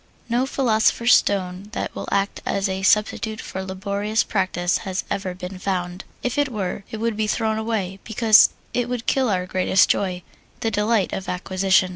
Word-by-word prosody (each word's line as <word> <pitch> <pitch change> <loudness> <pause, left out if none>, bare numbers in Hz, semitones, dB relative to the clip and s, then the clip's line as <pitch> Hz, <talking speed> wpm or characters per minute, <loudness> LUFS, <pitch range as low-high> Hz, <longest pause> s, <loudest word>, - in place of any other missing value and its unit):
No 245 +3 +1
philosopher's 235 -2 +3
stone 190 0 +1
that - - -3
will - - -5
act 200 0 0
as 195 0 0
a 190 0 -3
substitute 215 +2 +1
for 190 - -5
laborious 200 +3 -1
practise 180 -3 0
has 190 -1 -3
ever 190 -2 -2
been 180 0 -7
found. 180 -1 -3 0.2
If 250 +3 -1
it 290 -1 +2
were, 200 -3 -3
it 220 - -5
would 230 0 -1
be 215 0 0
thrown 220 0 0
away, 205 -4 -2
because 220 -1 +6 0.2
it 245 -1 -1
would 250 -1 -3
kill 260 -3 +2
our 180 -3 0
greatest 185 0 +3
joy 180 -2 0 0.4
the 225 - 0
delight 210 -2 +1
of 190 - -4
acquisition. 185 0 +2
200 Hz, 175 wpm, -22 LUFS, 185-220 Hz, 0.4 s, because